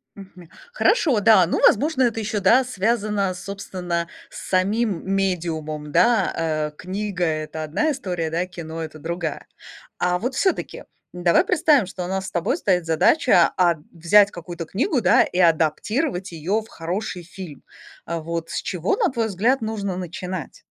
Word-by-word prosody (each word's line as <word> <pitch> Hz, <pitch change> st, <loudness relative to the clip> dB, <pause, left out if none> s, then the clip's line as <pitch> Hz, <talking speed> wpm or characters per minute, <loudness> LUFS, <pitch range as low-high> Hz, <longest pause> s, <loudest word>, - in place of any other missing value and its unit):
Мгм. 185 Hz, -4 st, -13 dB, 0.2 s
Хорошо, 330 Hz, -, +2 dB
да, 205 Hz, -4 st, +6 dB
ну, -, -, -1 dB
возможно, 265 Hz, +3 st, +4 dB
это 225 Hz, -2 st, 0 dB
ещё, 210 Hz, 0 st, -2 dB
да, 230 Hz, +7 st, +5 dB
связано, 210 Hz, -4 st, 0 dB
собственно, 180 Hz, -3 st, -4 dB, 0.2 s
с -, -, -9 dB
самим 195 Hz, +1 st, +1 dB
медиумом, 160 Hz, -6 st, -2 dB
да. 230 Hz, +2 st, +3 dB
Э, 155 Hz, -2 st, -1 dB
книга- 190 Hz, 0 st, -3 dB
это 155 Hz, 0 st, -3 dB
одна 235 Hz, -, 0 dB
история, 180 Hz, -, -3 dB
да, 170 Hz, +3 st, -1 dB
кино- 165 Hz, -2 st, -7 dB
это 155 Hz, -1 st, -7 dB
другая. 165 Hz, -1 st, -4 dB, 0.5 s
А 180 Hz, 0 st, +1 dB
вот, 250 Hz, +5 st, -2 dB
всё-таки 380 Hz, +4 st, -1 dB, 0.3 s
давай 175 Hz, -1 st, +3 dB
представим, 290 Hz, -, +3 dB
что 185 Hz, 0 st, -6 dB
у -, -, -5 dB
нас 190 Hz, 0 st, -3 dB
с -, -, -7 dB
тобой 175 Hz, -, 0 dB
стоит 180 Hz, -, +1 dB
задача, 165 Hz, -, +4 dB
а, 175 Hz, -2 st, +4 dB, 0.2 s
взять 200 Hz, +5 st, +4 dB
какую-то 170 Hz, -1 st, -7 dB
книгу, 250 Hz, -, 0 dB
да, 180 Hz, -, +5 dB
и 180 Hz, -, -5 dB
адаптировать 180 Hz, -, +1 dB
её 180 Hz, +7 st, -1 dB
в 220 Hz, -, -15 dB
хороший 180 Hz, +1 st, -4 dB
фильм. 175 Hz, -4 st, -10 dB, 0.4 s
А 170 Hz, 0 st, -3 dB
вот 165 Hz, 0 st, -4 dB
с -, -, -2 dB
чего, 180 Hz, -, -1 dB
на 410 Hz, -, +1 dB
твой 230 Hz, -3 st, -1 dB
взгляд, 225 Hz, +7 st, +1 dB
нужно 205 Hz, -4 st, -3 dB
начинать? 180 Hz, -2 st, -6 dB
185 Hz, 160 wpm, -22 LUFS, 170-215 Hz, 0.5 s, да